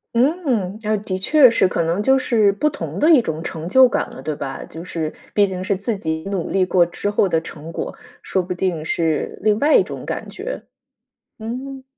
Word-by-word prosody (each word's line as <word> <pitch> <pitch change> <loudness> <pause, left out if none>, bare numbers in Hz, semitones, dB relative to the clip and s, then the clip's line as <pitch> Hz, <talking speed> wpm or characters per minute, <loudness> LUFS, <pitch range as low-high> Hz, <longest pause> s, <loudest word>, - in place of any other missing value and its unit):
嗯， 245 - +1
啊， 215 0 +1
的 185 -3 -2
确 275 +6 +6
是。 230 - +3
可 170 - -1
能 170 +5 0
就 265 +5 +4
是 225 -6 +3
不 300 +10 +1
同 290 - -6
的 310 +3 +4
一 275 - +6
种 160 -5 -4
成 160 -1 -5
就 260 +7 +6
感 - - -2
了， - - -10
对 150 +2 -3
吧？ 140 -2 -5
就 165 +2 -9
是 160 -3 -4 0.2
毕 205 - +4
竟 185 -2 -4
是 200 +1 0
自 205 +4 -2
己 160 -3 -3
努 190 -4 -2
力 190 -1 +2
过 180 -1 +3
之 175 +4 -3
后 205 -1 +2
的 165 -3 +1
成 160 0 -9
果， - - -4 0.3
说 190 - 0
不 180 0 -4
定 175 -3 -2
是 160 -1 -1
另 210 -1 +3
外 300 +2 +4
一 - - +6
种 - - -8
感 - - -4
觉。 - - -6 0.7
嗯。 260 +4 -6
195 Hz, 230 characters per minute, -20 LUFS, 165-240 Hz, 0.7 s, 确